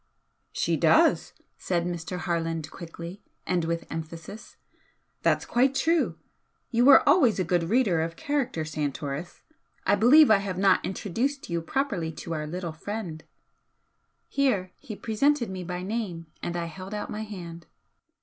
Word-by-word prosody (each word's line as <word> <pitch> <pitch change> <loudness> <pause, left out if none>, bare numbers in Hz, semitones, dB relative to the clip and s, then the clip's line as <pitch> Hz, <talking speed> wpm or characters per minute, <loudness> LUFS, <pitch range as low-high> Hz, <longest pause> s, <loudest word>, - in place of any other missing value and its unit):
"She - - 0
does!" - - +4 0.3
said 175 -2 -1
Mr. 175 0 -4
Harland, 165 -3 -2
quickly, 170 +3 -9 0.2
and 175 -2 0
with 170 0 -2
emphasis 165 +5 -8 0.6
"That's - - +2
quite 265 +3 +2
true! 330 +3 +1 0.5
You 240 0 +3
were 280 +1 +8
always 280 - +5
a 185 - +1
good 175 0 +1
reader 210 -8 +3
of 165 +1 -3
character, 260 - -1
Santoris! 145 +1 -4 0.4
I 200 - +4
believe 255 +7 +7
I 215 - +7
have 195 -2 -4
not 195 0 +4
introduced 230 +6 -2
you 170 0 0
properly 200 - -1
to 165 - -6
our 150 -1 -3
little 170 0 -4
friend" 175 -2 -6 1.0
here 210 -10 +1
he 240 -7 -8
presented 235 +2 +1
me 185 -1 -5
by 180 +1 -4
name 190 -5 -3 0.2
and 175 0 -3
I 170 - -2
held 185 +4 -7
out 210 - -4
my 210 - -4
hand. 175 -6 -8
185 Hz, 150 wpm, -27 LUFS, 165-225 Hz, 1.0 s, were